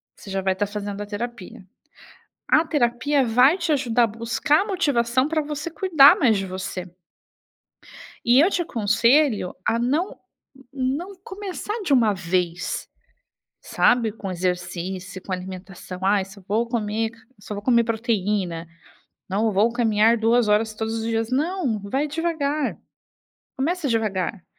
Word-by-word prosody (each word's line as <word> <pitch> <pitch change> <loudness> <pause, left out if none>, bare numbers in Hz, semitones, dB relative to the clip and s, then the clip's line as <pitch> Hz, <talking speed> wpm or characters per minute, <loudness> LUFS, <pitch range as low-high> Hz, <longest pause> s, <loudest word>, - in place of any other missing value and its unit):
Você - - -13
já 195 0 -2
vai 190 0 +1
estar 200 +2 -1
fazendo 205 0 -5
a - - -4
terapia. 205 -2 -7 0.8
A 310 - +4
terapia 275 0 +1
vai 250 +7 +4
te 345 -3 -2
ajudar 245 -5 +2
a - - +3
buscar 230 - +1
a - - -3
motivação 265 - +1
pra 315 0 0
você 300 +2 -4
cuidar 315 -4 +6
mais 230 -5 +4
de 195 -1 -2
você. 185 -1 -6 1.3
E 240 +2 +5
eu 330 +7 +5
te 355 - 0
aconselho 230 - +2
a 230 - +2
não 285 +10 -1 0.5
não 280 +8 -2
começar 415 +1 -5
de 355 - -1
uma 230 -5 +4
vez, 175 -2 -2 0.7
sabe, 240 -3 +2
com 200 -3 -6
exercício, 180 +1 -3
com 190 - -6
alimentação. 185 0 -7
"Ai, 195 0 +3
só 195 +1 -14
vou 225 +4 0
comer 220 -1 -1 0.3
só 210 - -7
vou 205 - -6
comer 235 0 +3
proteína. 210 -7 -1 0.6
Não, 210 +4 +1
vou 210 +4 +3
caminhar 225 -1 +3
2 230 +1 +3
horas 215 +1 +2
todos 220 +1 -3
os 225 0 -3
dias", 225 0 -1
não. 290 - 0
Vai 265 +9 -1
devagar. 305 -2 -1 0.8
Começa 320 +3 -1
devagar. 210 -4 -1
230 Hz, 145 wpm, -23 LUFS, 200-280 Hz, 1.3 s, cuidar